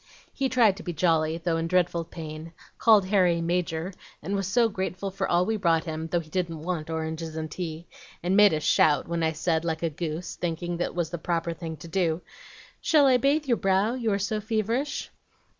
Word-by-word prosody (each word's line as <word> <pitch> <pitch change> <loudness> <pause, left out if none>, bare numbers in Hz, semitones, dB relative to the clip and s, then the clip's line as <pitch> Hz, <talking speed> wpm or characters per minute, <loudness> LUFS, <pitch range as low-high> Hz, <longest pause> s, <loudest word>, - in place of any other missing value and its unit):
He 270 -1 0
tried 230 -7 +4
to - - -8
be 175 - -4
jolly, 160 -1 +2
though 165 -1 -1
in 165 0 -1
dreadful 175 -1 +1
pain; 160 0 -8 0.3
called 215 -4 +6
Harry 185 -3 +3
'Major,' 170 +1 -1 0.3
and 195 +5 -2
was 195 -2 -1
so 230 +4 +3
grateful 190 -1 -3
for 195 - -2
all 175 +1 +3
we 220 +2 0
brought 165 -5 +2
him, 160 -1 -4
though 175 +1 0
he 155 -1 -16
didn't 165 -4 -2
want 165 -2 -3
oranges 160 0 -4
and 155 -1 -4
tea, 165 -1 -5 0.4
and 180 +2 +1
made 205 -1 +7
us 155 -1 -1
shout 150 -2 +3
when 170 0 -2
I 160 0 +1
said, 160 +1 0
like 160 -1 -2
a 165 - 0
goose, 160 +2 -4
thinking 175 0 -3
that 175 - -2
was 170 -2 -1
the 175 - -4
proper 170 0 -1
thing 165 -1 -6
to 170 - -10
do, 165 -1 0 0.6
'Shall 305 -3 +4
I 260 -2 +5
bathe 285 +5 +2
your 240 -4 +2
brow, 195 +3 +2
you 235 -4 -1
are 200 - +2
so 210 +2 -2
feverish?' 225 +6 -2
175 Hz, 210 wpm, -26 LUFS, 160-200 Hz, 0.6 s, made